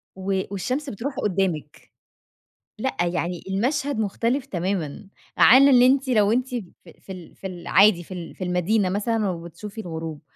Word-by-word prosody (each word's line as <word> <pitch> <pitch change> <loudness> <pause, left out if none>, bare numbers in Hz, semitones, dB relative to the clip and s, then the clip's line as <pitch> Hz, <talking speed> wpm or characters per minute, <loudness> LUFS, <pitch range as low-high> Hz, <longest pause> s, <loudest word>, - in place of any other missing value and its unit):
و 190 0 -1
والشمس 255 +9 -3
بتروح 265 +5 -5
قدامِك، 180 - -2 0.9
لأ 265 +4 -2
يعني 175 0 -2
المشهد 245 +6 -1
مختلف 230 +5 -1
تمامًا 185 - -3 0.3
عن 265 +3 +8
إن 255 -3 +6
أنتِ 265 +2 +4
لو 210 -4 +3
أنتِ 250 +2 0
ف 230 -5 -4 0.3
في - - -12
ال 180 -3 -10
في 195 - -7
العادي 185 +1 +3
في 185 - -10
ال 175 -2 -8
في - - -6
المدينة 185 +3 +1
مثلًا 210 +2 0
وبتشوفي 185 +5 -7
الغروب، 160 -4 -6
200 Hz, 150 wpm, -23 LUFS, 180-240 Hz, 0.9 s, عن